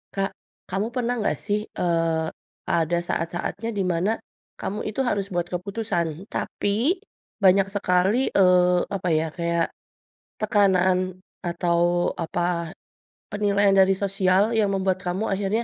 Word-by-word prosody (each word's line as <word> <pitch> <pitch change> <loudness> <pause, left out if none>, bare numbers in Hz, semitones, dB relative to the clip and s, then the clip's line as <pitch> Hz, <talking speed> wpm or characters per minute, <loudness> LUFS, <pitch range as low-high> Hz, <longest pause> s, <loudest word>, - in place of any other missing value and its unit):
Kak, 195 0 0 0.4
kamu 195 +3 -1
pernah 245 -1 0
nggak - - 0
sih, 210 0 +1 0.2
eee, 165 -2 +1 0.5
ada 165 +1 +1
saat-saatnya 175 +6 -2
di 195 - +1
mana 170 +5 0 0.5
kamu 205 +2 -3
itu 215 - -6
harus 200 -4 0
buat 175 -1 0
keputusan? 195 0 -1 0.3
Tapi 200 0 -1 0.7
banyak 190 +1 +5
sekali, 195 +5 +1
eee, 180 -1 +5
apa 190 -2 -2
ya, 155 +1 +2
kayak 170 +1 0 0.7
tekanan 185 -3 +2 0.2
atau 175 0 +1
apa, 170 +1 -2 0.5
penilaian 205 -1 +2
dari 190 0 +6
sosial 195 +2 +2
yang 210 -3 +2
membuat 190 -1 0
kamu 185 +4 -1
akhirnya 200 +3 0
190 Hz, 125 wpm, -24 LUFS, 175-200 Hz, 0.7 s, dari